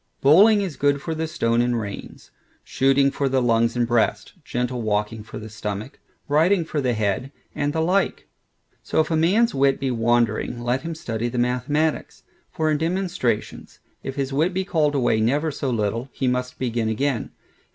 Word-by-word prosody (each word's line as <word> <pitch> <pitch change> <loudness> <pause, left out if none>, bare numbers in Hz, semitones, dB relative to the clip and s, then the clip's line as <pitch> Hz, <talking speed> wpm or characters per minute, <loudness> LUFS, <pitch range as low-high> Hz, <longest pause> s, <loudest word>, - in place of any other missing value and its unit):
Bowling 200 +9 +6
is 180 -8 -4
good 145 0 +2
for 160 +3 -4
the 160 0 -2
stone 115 -6 +1
and 120 -1 +1
reins; 100 -2 -8 0.3
shooting 135 +1 +2
for 140 0 -1
the 130 0 +2
lungs 115 -1 +2
and 120 -1 +2
breast; 120 -1 0
gentle 125 -2 -2
walking 105 0 -1
for 110 - -9
the 110 - -7
stomach; 105 +2 -6 0.3
riding 165 +5 +3
for 150 -2 -2
the 125 -2 +1
head; 110 +5 -1 0.2
and 145 0 -1
the 160 +1 -1
like. 185 +4 0 0.5
So - - -1
if 160 - +1
a - - +2
man's 195 +9 +3
wit 135 0 +2
be 135 -1 -1
wandering, 120 0 +1
let 120 +2 -1
him 165 0 -5
study 115 -6 -3
the 125 - -5
mathematics; 125 +6 -1 0.3
for 160 -3 0
in 150 - +1
demonstrations, 170 - -2 0.2
if 135 - -6
his 135 -1 -2
wit 165 +6 +1
be 190 0 0
called 155 -6 +1
away 120 -4 +2
never 145 +8 +1
so 140 -1 -3
little, 115 +2 -1
he 130 - -2
must 125 0 -1
begin 115 -3 -1
again. 125 +2 -1
135 Hz, 185 wpm, -23 LUFS, 115-155 Hz, 0.5 s, Bowling